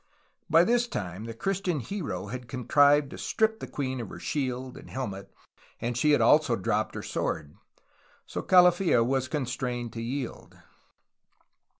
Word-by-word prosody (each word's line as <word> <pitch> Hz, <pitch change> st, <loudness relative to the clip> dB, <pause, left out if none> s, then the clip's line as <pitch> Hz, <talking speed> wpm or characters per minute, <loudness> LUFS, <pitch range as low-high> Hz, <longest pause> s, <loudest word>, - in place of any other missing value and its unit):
By 165 Hz, +2 st, +6 dB
this 240 Hz, +4 st, +2 dB
time 95 Hz, -, -5 dB
the 115 Hz, -, -6 dB
Christian 190 Hz, -, -1 dB
hero 130 Hz, -, -4 dB
had 125 Hz, +3 st, -7 dB
contrived 140 Hz, +3 st, +3 dB
to -, -, -8 dB
strip 220 Hz, 0 st, +1 dB
the -, -, -6 dB
queen 130 Hz, -3 st, -3 dB
of 110 Hz, -, -7 dB
her -, -, -9 dB
shield 130 Hz, -2 st, -3 dB
and -, -, -12 dB
helmet, 100 Hz, -7 st, -5 dB, 0.5 s
and 120 Hz, +1 st, -2 dB
she 150 Hz, +6 st, +2 dB
had 145 Hz, -, +4 dB
also 150 Hz, -5 st, +5 dB
dropped 105 Hz, +1 st, -1 dB
her -, -, -5 dB
sword. 75 Hz, -2 st, -3 dB, 0.7 s
So -, -, -4 dB
Calafia 180 Hz, -7 st, +5 dB
was 130 Hz, +1 st, 0 dB
constrained 125 Hz, -4 st, -3 dB
to 115 Hz, -, -5 dB
yield. 125 Hz, +2 st, -5 dB
130 Hz, 155 wpm, -28 LUFS, 115-155 Hz, 0.7 s, By